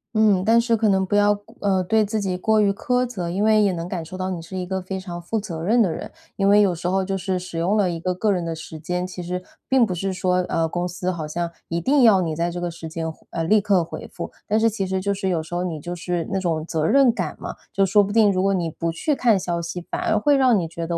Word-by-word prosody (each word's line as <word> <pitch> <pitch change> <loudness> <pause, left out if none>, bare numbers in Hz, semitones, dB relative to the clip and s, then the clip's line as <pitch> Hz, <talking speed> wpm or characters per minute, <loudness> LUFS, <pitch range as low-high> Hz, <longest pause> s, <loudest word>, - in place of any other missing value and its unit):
嗯， 210 -4 +4
但 225 +3 +5
是 235 0 +2
可 220 -1 +2
能 190 -1 +2
不 195 - -1
要， 205 0 +3 0.2
呃， 190 -2 +2
对 220 +4 +2
自 215 +1 -2
己 190 -3 -1
过 220 +4 +2
于 205 -1 +4
苛 250 +5 0
责， 195 -9 -4
因 190 +4 -1
为 215 0 +5
也 200 -2 +3
能 170 -1 -4
感 180 -2 -4
受 165 +3 -8
到 185 0 -2
你 175 -2 -4
是 165 +3 -8
一 180 - -3
个 190 +1 -3
非 190 +1 -5
常 175 -2 -7
负 220 +6 -2
责 175 -6 -6
任 225 +7 +3
的 185 - 0
人， - - -6 0.2
因 195 0 +2
为 205 +1 +6
有 195 -3 +3
时 175 +1 -4
候 190 +1 +1
就 195 0 -2
是 190 0 -1
使 180 -2 -5
用 185 +6 +1
了 195 -4 +2
一 165 - -4
个 180 +2 -2
个 210 +3 +1
人 180 -3 0
的 165 -1 -3
时 160 0 -9
间， 180 +3 -2
其 185 0 -7
实 180 +1 -4 0.2
并 260 -3 +4
不 190 - -3
是 195 +2 -2
说， 180 0 0
呃， 165 0 +1
公 175 +2 -2
司 180 +1 -3
好 160 -4 -5
像 170 +2 -3 0.2
一 170 - -2
定 275 - +3
要 215 -6 +6
你 160 -3 -2
在 170 +2 0
这 175 +1 -5
个 175 -1 -3
时 165 -1 -8
间， 165 +1 -4 0.2
呃， 165 - -3
立 210 +6 +4
刻 195 -3 +2
回 165 - -8
复， - - -6 0.2
但 215 +1 +2
是 225 - +4
其 205 -3 -1
实 190 0 -1
就 200 +2 0
是 195 -1 -2
有 165 -3 0
时 160 - -11
候 175 +1 -1
你 170 -4 -3
就 175 +4 -5
是 175 -1 -3
那 195 - 0
种 165 -4 -1
责 160 -2 -1
任 265 0 +5
感 - - -3
嘛， - - -5 0.2
就 195 - +2
说 205 +2 +4
不 200 - -3
定 215 -1 +5
如 185 -1 0
果 195 +1 +2
你 175 -2 -1
不 165 +1 -2
去 295 - -1
看 230 -7 +3
消 175 -2 -2
息， 170 +1 -5
反 - - -2
而 215 - +1
会 285 +7 +3
让 260 -4 +4
你 170 - -2
觉 165 +1 -5
得 170 0 -1
185 Hz, 320 characters per minute, -22 LUFS, 170-205 Hz, 0.2 s, 为